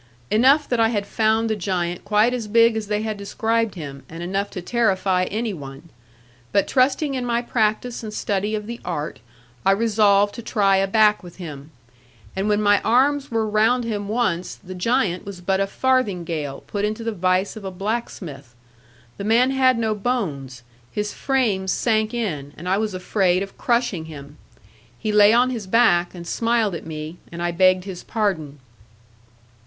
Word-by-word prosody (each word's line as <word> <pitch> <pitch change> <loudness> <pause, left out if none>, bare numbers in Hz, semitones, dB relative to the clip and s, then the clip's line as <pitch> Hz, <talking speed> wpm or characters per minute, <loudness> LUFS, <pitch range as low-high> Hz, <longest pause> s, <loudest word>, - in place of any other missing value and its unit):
Enough 270 +7 +4
that 245 - +1
I 225 - +5
had 205 -3 -1
found 220 +1 +1
the 220 - 0
giant 175 -3 -2
quite 210 +4 +3
as 235 -4 -3
big 230 +1 +4
as 220 -2 -3
they 210 +1 -1
had 215 -1 -3
described 225 +2 -1
him, 140 -5 -7
and 165 +1 -7
enough 195 +3 -2
to - - -6
terrify 190 -3 +1
any 220 +3 -2
one. 140 0 -10 0.6
But 200 - +2
trusting 275 +2 +2
in 255 -2 -2
my 240 0 0
practice 230 +1 0
and 220 -2 -6
study 210 0 -1
of 210 -1 -4
the 235 +2 -6
art, 155 -4 -4 0.4
I 195 - +3
resolved 205 -2 +3
to 235 - -7
try 200 -4 +2
a 195 0 +2
back 210 +1 +4
with 175 -2 -12
him; 150 -5 -9 0.7
and 195 +2 -1
when 210 0 +2
my 205 -1 +4
arms 275 +4 +2
were 225 -2 0
round 220 +4 +2
him 210 -3 -3
once, 205 -6 -1
the 185 -1 -10
giant 185 -1 0
was 200 -2 -8
but 190 +2 0
a 195 - +1
farthingale 180 - -1
put 205 -1 -3
into 215 +2 -2
the 230 - -1
vice 185 0 0
of 215 - -9
a 190 - -4
blacksmith. 180 - -5 0.6
The - - -5
man 235 +5 +3
had 260 -2 +3
no 220 -2 0
bones; 155 - -3 0.3
his 210 0 -3
frame 225 -9 0
sank 220 +2 +1
in, 165 - -3
and 175 - -8
I 190 +2 +2
was 215 -3 -2
afraid 185 0 +1
of 195 - -10
crushing 235 -9 0
him. 145 -2 -11 0.6
He 215 - -2
lay 210 0 +6
on 245 +2 +4
his 225 -6 -5
back, 185 -5 +3
and 170 -1 -8
smiled 230 +1 +1
at 165 - -6
me; 155 +1 -6
and 170 - -7
I 175 0 -1
begged 185 +1 +3
his 190 -2 -7
pardon. 180 -10 -2
205 Hz, 180 wpm, -22 LUFS, 180-230 Hz, 0.7 s, lay